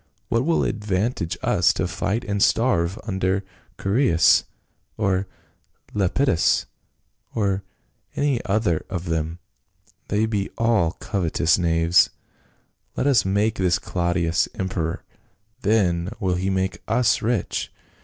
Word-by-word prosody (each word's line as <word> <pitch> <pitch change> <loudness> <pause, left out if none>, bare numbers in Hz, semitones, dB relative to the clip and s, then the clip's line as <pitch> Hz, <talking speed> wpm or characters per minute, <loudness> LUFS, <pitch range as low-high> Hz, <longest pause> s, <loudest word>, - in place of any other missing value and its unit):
What 115 +2 +1
will 165 0 +2
it - - +1
advantage 105 -4 -2
us - - +3
to - - -1
fight 110 +5 -2
and 100 -1 -2
starve 100 -7 +2
under 95 -1 -1 0.4
Chaereas, 100 - +4 0.5
or 95 -2 0 0.7
Lepidus, 105 - +2 0.7
or 100 -3 0 0.5
any 140 -4 +1
one 95 -5 +1
of 90 -2 -4
them? 80 0 -2 0.7
they 105 +2 +1
be 105 -3 -2
all 115 -8 +2
covetous 85 -2 0
knav^es. 85 0 +3 0.9
Let - - -1
us 130 -9 +4
make 100 +3 +1
this 90 -1 +2
Claudius 85 -1 0
emperor, 90 -3 -3 0.6
then 95 -5 +1
will 95 -4 0
he 90 +2 -1
make 95 -2 -1
us 115 +1 +2
rich. 115 -4 -1
95 Hz, 115 wpm, -23 LUFS, 85-110 Hz, 0.9 s, Chaereas